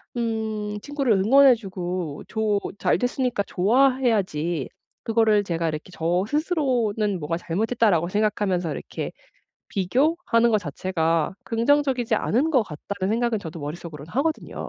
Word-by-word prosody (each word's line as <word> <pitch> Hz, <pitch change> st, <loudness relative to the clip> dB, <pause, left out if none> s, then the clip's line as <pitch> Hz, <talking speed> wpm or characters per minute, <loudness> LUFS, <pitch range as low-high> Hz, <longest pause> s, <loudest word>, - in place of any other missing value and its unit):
음 220 Hz, -3 st, -2 dB
친구를 280 Hz, -3 st, 0 dB
응원해 255 Hz, +6 st, +6 dB
주고 180 Hz, -7 st, -5 dB
조 215 Hz, -2 st, 0 dB, 0.2 s
잘 -, -, +2 dB
됐으니까 245 Hz, -3 st, -1 dB
좋아해야지.' 200 Hz, -, +1 dB, 0.3 s
그거를 220 Hz, -2 st, +3 dB
제가 170 Hz, -3 st, -2 dB
이렇게 155 Hz, +3 st, -5 dB
저 175 Hz, +2 st, 0 dB
스스로는 245 Hz, -, 0 dB
뭐가 160 Hz, +2 st, -2 dB
'잘못했다.'라고 195 Hz, -1 st, +1 dB
생각하면서 195 Hz, -4 st, 0 dB
'이렇게 140 Hz, -, -5 dB, 0.6 s
비교하는 235 Hz, -, +2 dB
거 220 Hz, -, +4 dB
자체가 165 Hz, -1 st, -1 dB
긍정적이지 255 Hz, +1 st, +1 dB
않은 275 Hz, +9 st, +1 dB
것 260 Hz, -6 st, +4 dB
같다.'는 195 Hz, +3 st, -4 dB
생각은 235 Hz, -1 st, +1 dB
저도 165 Hz, -2 st, -7 dB
머릿속으로는 150 Hz, 0 st, -7 dB
하거든요. 310 Hz, +6 st, -2 dB
210 Hz, 340 characters per minute, -24 LUFS, 175-245 Hz, 0.6 s, 응원해